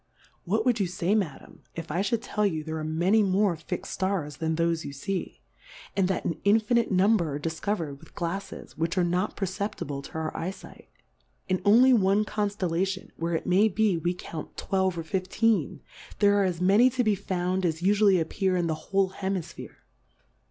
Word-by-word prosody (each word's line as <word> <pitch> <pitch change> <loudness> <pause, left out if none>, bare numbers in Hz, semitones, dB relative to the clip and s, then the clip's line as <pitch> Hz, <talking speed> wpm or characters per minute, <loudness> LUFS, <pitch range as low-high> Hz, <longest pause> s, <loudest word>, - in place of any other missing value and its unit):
What 220 +5 0
wouM 245 -3 +2
you 190 - +1
fay, 180 +2 -1
Madam, 200 -8 -3
if 165 -1 -6
I 175 +5 0
fliould 215 +3 0
tell 210 - -1
you, 160 -7 0
there 160 0 -4
are - - -4
many 170 +8 +2
more 195 -1 +2
fix'd 160 0 -6
Scars 185 -6 -2
than 160 -1 -1
thofe 165 0 0
you - - -6
fee? 190 +6 -4 0.5
And 195 -2 +2
that 190 - -2
an 165 - -2
infiiiite 220 +3 +3
Number 185 -5 +2
are - - -3
difcover'd 160 -1 -3
with 160 - -18
GlalTes, 175 +3 -5
which 165 +2 -2
are 180 - +4
not 180 +3 0
Perceptible 190 -7 -3
to - - -12
our 160 0 -3
Eye 165 - -2
fight: 195 - -12 0.6
In 185 0 0
only 240 +6 +6
one 205 -1 +3
Conftel 205 -4 -2
lation, 190 +3 -2
where, 165 0 -1
it - - -3
may 195 +4 +4
be, 215 -1 +2
we 175 +2 -1
count 165 -3 -8
twelve 190 -2 0
or 165 - -3
fifteen, 190 - 0 0.4
there 205 -1 +4
are - - +3
as 180 -3 -1
many 200 +7 +5
to 255 0 0
be 215 -2 +3
found 185 -1 -2
as 165 -2 -1
ufually 200 0 +4
appear 185 +3 0
in 175 - 0
the 165 - 0 0.2
whole 195 -1 +2
Hemifphere. 190 -3 -5
185 Hz, 190 wpm, -27 LUFS, 165-205 Hz, 0.6 s, only